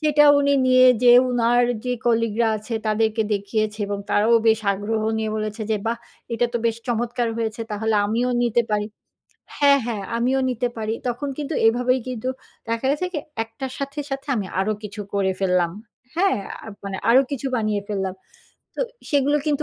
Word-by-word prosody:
সেটা 300 -1 +4
উনি 280 0 +3
নিয়ে 255 0 +6 0.2
যেয়ে 245 0 +8
উনার 240 0 +3 0.2
যে 250 - 0
কলিগরা 230 -1 +2
আছে 220 +2 -6
তাদেরকে 220 +1 +1
দেখিয়েছে 210 +1 -1
এবং 200 0 -3
তারাও 215 +3 +4
বেশ 220 0 +3
আগ্রহ 210 +3 -2 0.2
নিয়ে 220 -1 -1
বলেছে, 215 +1 -3
যে 215 - +2
"বাহ! 230 +1 -1 0.4
এটা 240 +1 +2
তো 235 - 0
বেশ 225 -1 0
চমৎকার 240 0 -1
হয়েছে! 225 -1 -3
তাহলে 220 +1 -1
আমিও 235 +4 0
নিতে 240 0 +2
পারি।" 210 0 0 0.7
হ্যাঁ, 280 -1 +5
হ্যাঁ। 220 -4 -3
"আমিও 255 +3 +1
নিতে 245 0 -1
পারি।" 220 0 -2
তখন 245 +4 -3
কিন্তু 300 +1 -3
এভাবেই 250 +3 +2
কিন্তু 255 0 -4 0.4
দেখা 230 +3 -1
গেছে 300 +6 0
কি? 320 - -1 0.3
একটার 255 +4 -7
সাথে, 280 +1 -5
সাথে 270 +1 -4
আমি 205 -4 -2
আরো 215 +3 +1
কিছু 210 0 -7
করে 195 -1 +1
ফেললাম। 180 -3 +2 0.5
হ্যাঁ? 385 - +2 0.3
আ - - -11 0.2
মানে 195 -1 -4
আরো 255 +3 +7
কিছু 280 -1 -3
বানিয়ে 215 -2 0
ফেললাম। 195 -3 -2 0.6
তো - - -3 0.3
সেগুলো 285 0 +3
কিন্তু 300 0 +1
230 Hz, 175 wpm, -22 LUFS, 215-255 Hz, 0.7 s, যেয়ে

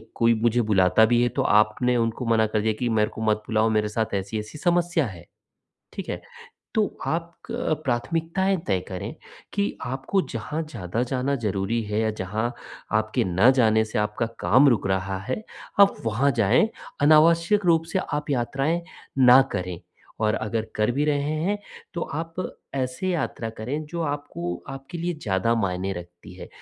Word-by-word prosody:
कोई 115 0 +4
मुझे 120 +1 +3
बुलाता 95 +3 +5
भी 120 +1 +3
है, 120 - +2
तो - - -1
आपने 110 +4 +3
उनको 115 +2 -1
मना 115 -1 +3
कर 105 - +2
दिया 110 0 +1
कि 120 - 0
"मेरे 110 -1 +2
को 110 - -6
मत 110 -1 +1
बुलाओ, 110 0 +2
मेरे 105 -1 +1
साथ 110 0 -2
ऐसी-ऐसी 105 +7 -4
समस्या 175 -2 +2
है।" 85 -4 -10 0.7
ठीक - - -6
है? - - -3 0.5
तो 215 -3 +1
आप 170 +1 -2 0.2
क 235 -8 0
प्राथमिकताएँ 165 +9 0
तय 95 -3 +2
करें 95 -1 -5 0.4
कि 200 0 +1 0.2
आपको 135 +10 0
जहाँ 150 +8 -3
ज़्यादा 110 +2 -2
जाना 135 +2 0
ज़रूरी 100 +4 0
है 105 +1 -2
या 110 -1 +1
जहाँ 110 +6 -2 0.5
आपके 110 0 -1
ना 95 +7 +4
जाने 110 -1 +4
से 110 - -2
आपका 105 +2 -1
काम 130 +5 +5
रुक 105 -5 +1
रहा 95 0 -1
है, 130 - -4 0.4
आप 200 0 +7
वहाँ 125 +6 +2
जाएँ। 120 - +4 0.3
अनावश्यक 170 +6 +5
रूप 165 -2 +4
से - - +2
आप 150 0 -2
यात्राएँ 140 +6 0 0.5
ना 125 +2 +9
करें 90 -3 -3 0.5
और 105 - +2
अगर 110 0 -2
कर 105 +3 +2
भी 145 +4 0
रहे 145 0 0
हैं, 205 +3 +1 0.4
तो 170 - -3
आप 165 +1 -4 0.4
ऐसे 130 +7 -2
यात्रा 140 -9 -2
करें, 140 +8 -3
जो 170 +2 -4
आपको 145 - -4
आपके 135 +6 -7
लिए 175 +1 -1
ज़्यादा 100 +2 +1
मायने 95 -2 -1
रखती 90 0 -10
है। - - -9
120 Hz, 170 wpm, -25 LUFS, 105-150 Hz, 0.7 s, ना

